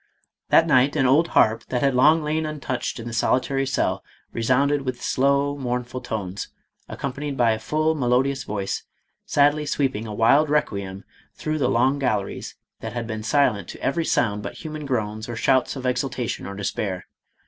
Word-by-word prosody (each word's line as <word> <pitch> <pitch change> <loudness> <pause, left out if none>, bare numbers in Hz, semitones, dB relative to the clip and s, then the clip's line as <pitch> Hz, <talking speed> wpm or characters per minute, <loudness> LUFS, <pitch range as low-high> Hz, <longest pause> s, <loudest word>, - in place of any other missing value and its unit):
* - - -61
That - - +6
night 130 +4 +3
an 140 -4 +2
old 145 +6 +4
harp 110 +1 +4
that 125 0 -1
had 135 -1 +3
long 150 +5 +5
lain 155 +1 0
untouched 145 -6 -3
in 115 - -7
the 120 - -6
solitary 135 +4 +1
cell, 135 - 0 0.3
resounded 135 +5 +2
with 130 -2 -4
slow, 140 +2 +1
mournful 125 -1 -3
tones, 105 -5 -4 0.4
accompanied 140 +1 -4
by 120 -2 +4
a 110 - -1
full, 155 +4 +1
melodious 135 -1 +1
voice, 100 -2 -3 0.5
sadly 145 +1 +3
sweeping 130 -7 -1
a 105 - -5
wild 140 +8 +4
requiem 100 -10 -1 0.3
through 155 0 -2
the 125 - +2
long 130 +4 +2
galleries 105 -7 -2 0.2
that 110 0 -6
had 120 -1 -3
been 110 -1 -4
silent 110 -5 +1
to - - -9
every 165 +4 +1
sound 105 -8 +1
but 100 - -6
human 155 -2 -6
groans 110 -2 -2
or 120 - -4
shouts 130 +4 +2
of 130 -1 -6
exultation 125 -1 -2
or 100 - -6
despair. 100 -1 -3
130 Hz, 175 wpm, -23 LUFS, 110-145 Hz, 0.5 s, That